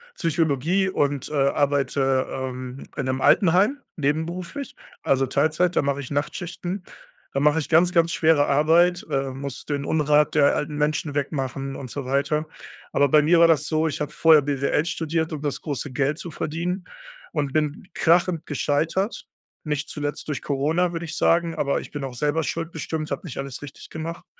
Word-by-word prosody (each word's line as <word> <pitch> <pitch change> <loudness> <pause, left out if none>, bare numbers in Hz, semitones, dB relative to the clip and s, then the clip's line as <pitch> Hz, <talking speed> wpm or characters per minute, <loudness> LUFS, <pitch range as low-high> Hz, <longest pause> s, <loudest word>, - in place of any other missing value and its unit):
Psychologie 165 +3 +1
und, 145 -6 -1
äh, - - -8 0.2
arbeite, 135 -2 +1
ähm, 130 0 -5
in 140 - -2
'nem 130 0 -1
Altenheim. 195 - +4 0.2
Nebenberuflich, 170 - -3 0.3
also 135 -1 +2
Teilzeit. 155 +6 +1
Da - - +4
mache 140 0 0
ich 135 - -6
Nachtschichten. 175 +5 -3 0.5
Da 135 - 0
mache 150 +2 +3
ich 150 - -4
ganz, 170 +2 +5
ganz 170 -1 +3
schwere 160 -3 +3
Arbeit, 170 +5 +3
äh, 135 0 0
muss 135 0 -6
den 145 -1 -2
Unrat 150 0 +3
der 145 -2 +4
alten 150 0 -3
Menschen 150 0 0
wegmachen 135 -1 -3
und 130 -3 -7
so 140 -3 -5
weiter. 150 +3 0 0.5
Aber 140 -1 +3
bei 150 +1 +6
mir 165 +3 +4
war 170 - +7
das 155 -2 +2
so, 160 0 +1
ich 150 0 -3
habe 150 0 -2
vorher 155 -1 +6
BWL 140 +2 0
studiert, 160 -1 -1
um 150 - -5
das 145 -2 -3
große 145 -2 -4
Geld 140 +3 0
zu 170 - -7
verdienen 175 +6 -3 0.5
und 145 -3 -1
bin 155 +3 -1
krachend 170 0 +2
gescheitert. 160 - -1 0.4
Nicht 150 0 -2
zuletzt 145 0 -4
durch 145 - -2
Corona, 160 +6 0
würde 165 0 -4
ich 160 0 -6
sagen, 170 0 +2
aber 140 -3 0
ich - - -11
bin 145 -2 -5
auch 130 -2 -5
selber 150 +4 0
schuld 165 +2 -3
bestimmt. 160 0 -4
Habe 180 - -4
nicht 130 - -8
alles 135 0 -5
richtig 145 -2 -10
gemacht. 165 +1 -6
150 Hz, 180 wpm, -24 LUFS, 140-165 Hz, 0.5 s, war